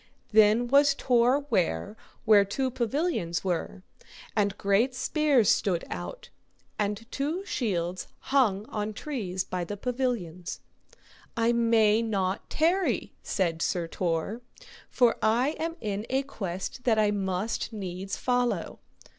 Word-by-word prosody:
Then 220 Hz, +2 st, +5 dB
was 280 Hz, +2 st, +5 dB
Tor 250 Hz, +1 st, +3 dB
ware 165 Hz, -, 0 dB, 0.3 s
where 210 Hz, -2 st, +7 dB
two 255 Hz, +7 st, -2 dB
pavilions 240 Hz, -, -1 dB
were, 185 Hz, +1 st, -3 dB, 0.5 s
and 205 Hz, -2 st, +1 dB
great 210 Hz, +6 st, +2 dB
spears 280 Hz, -, +3 dB
stood 180 Hz, -4 st, +1 dB
out, -, -, -6 dB, 0.5 s
and 210 Hz, +2 st, -1 dB
two 315 Hz, +8 st, -2 dB
shields 185 Hz, -, -2 dB, 0.3 s
hung 215 Hz, -7 st, +3 dB
on 210 Hz, 0 st, -3 dB
trees 205 Hz, -8 st, -3 dB
by 180 Hz, -1 st, -3 dB
the 205 Hz, +4 st, -5 dB
pavilions. 225 Hz, -8 st, -3 dB, 0.8 s
I 230 Hz, +1 st, +3 dB
may 230 Hz, -2 st, +4 dB
not 195 Hz, -4 st, -2 dB
tarry, 350 Hz, +4 st, +1 dB
said 170 Hz, -4 st, -1 dB
Sir 175 Hz, -1 st, 0 dB
Tor, 175 Hz, +7 st, -2 dB, 0.5 s
for 240 Hz, -2 st, +3 dB
I 235 Hz, +5 st, +3 dB
am 330 Hz, +1 st, -2 dB
in 210 Hz, 0 st, -3 dB
a 265 Hz, +1 st, +1 dB
quest 195 Hz, -2 st, -5 dB
that 230 Hz, -3 st, +3 dB
I 210 Hz, -1 st, +3 dB
must 195 Hz, +3 st, -2 dB
needs 195 Hz, -2 st, -5 dB
follow. 245 Hz, -1 st, -1 dB
215 Hz, 125 wpm, -28 LUFS, 190-255 Hz, 0.8 s, where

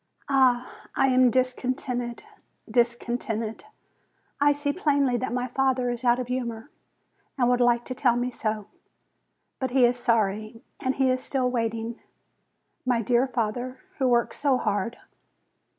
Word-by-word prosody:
Ah, 255 Hz, -2 st, +2 dB, 0.2 s
I 270 Hz, -, +3 dB
am 255 Hz, -1 st, +5 dB
discontented, 250 Hz, -1 st, -1 dB, 0.4 s
discontented! 235 Hz, -1 st, -1 dB, 0.7 s
I 290 Hz, +1 st, +5 dB
see 290 Hz, 0 st, 0 dB
plainly 285 Hz, -7 st, +2 dB
that 255 Hz, -1 st, -3 dB
my 250 Hz, +1 st, -1 dB
father 255 Hz, -1 st, +1 dB
is 240 Hz, +1 st, -5 dB
out 240 Hz, -1 st, +4 dB
of 250 Hz, -, -2 dB
humor, 240 Hz, -1 st, -4 dB, 0.7 s
and 245 Hz, -2 st, +3 dB
would 250 Hz, 0 st, +2 dB
like 240 Hz, -1 st, +3 dB
to 255 Hz, -, -4 dB
tell 250 Hz, -2 st, +2 dB
me 245 Hz, +1 st, -1 dB
so; 215 Hz, -3 st, -3 dB, 0.9 s
but 260 Hz, -, -1 dB
he 250 Hz, 0 st, +4 dB
is 245 Hz, +1 st, +1 dB
sorry, 220 Hz, -1 st, 0 dB, 0.2 s
and 260 Hz, 0 st, -1 dB
he 265 Hz, -1 st, +3 dB
is 255 Hz, 0 st, -1 dB
still 255 Hz, -2 st, 0 dB
waiting. 230 Hz, -1 st, -2 dB, 0.8 s
My 245 Hz, -2 st, +1 dB
dear 245 Hz, +4 st, +2 dB
father, 245 Hz, +1 st, -2 dB, 0.2 s
who 265 Hz, -, +2 dB
works 240 Hz, -1 st, +1 dB
so 280 Hz, -3 st, +3 dB
hard 210 Hz, +1 st, -1 dB
245 Hz, 145 wpm, -26 LUFS, 235-255 Hz, 0.9 s, am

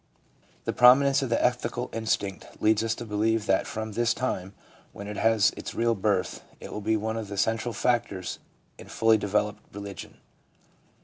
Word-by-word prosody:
The -, -, -1 dB
prominence 135 Hz, +3 st, +6 dB
of 135 Hz, -, -2 dB
the 115 Hz, -, +2 dB
ethical 125 Hz, 0 st, -1 dB
instinct 110 Hz, -3 st, -3 dB
leads 110 Hz, 0 st, +3 dB
us 115 Hz, 0 st, 0 dB
to 120 Hz, -, -7 dB
believe 110 Hz, +1 st, 0 dB
that 95 Hz, -, +1 dB
from 110 Hz, 0 st, -5 dB
this 115 Hz, +1 st, +1 dB
time, 95 Hz, -7 st, -3 dB, 0.4 s
when 100 Hz, -, -8 dB
it 105 Hz, 0 st, -6 dB
has 110 Hz, -2 st, +3 dB
its -, -, -7 dB
real 115 Hz, 0 st, +2 dB
birth, 95 Hz, -4 st, -1 dB, 0.2 s
it -, -, -9 dB
will 105 Hz, -, -5 dB
be 110 Hz, +1 st, +1 dB
one 110 Hz, +1 st, -3 dB
of 110 Hz, -2 st, -4 dB
the 100 Hz, 0 st, -7 dB
central 115 Hz, +3 st, 0 dB
factors 110 Hz, -7 st, -1 dB, 0.4 s
in -, -, -11 dB
fully 115 Hz, -1 st, +3 dB
developed 105 Hz, +1 st, -1 dB
religion. 100 Hz, -1 st, -8 dB
110 Hz, 175 wpm, -27 LUFS, 105-115 Hz, 0.4 s, prominence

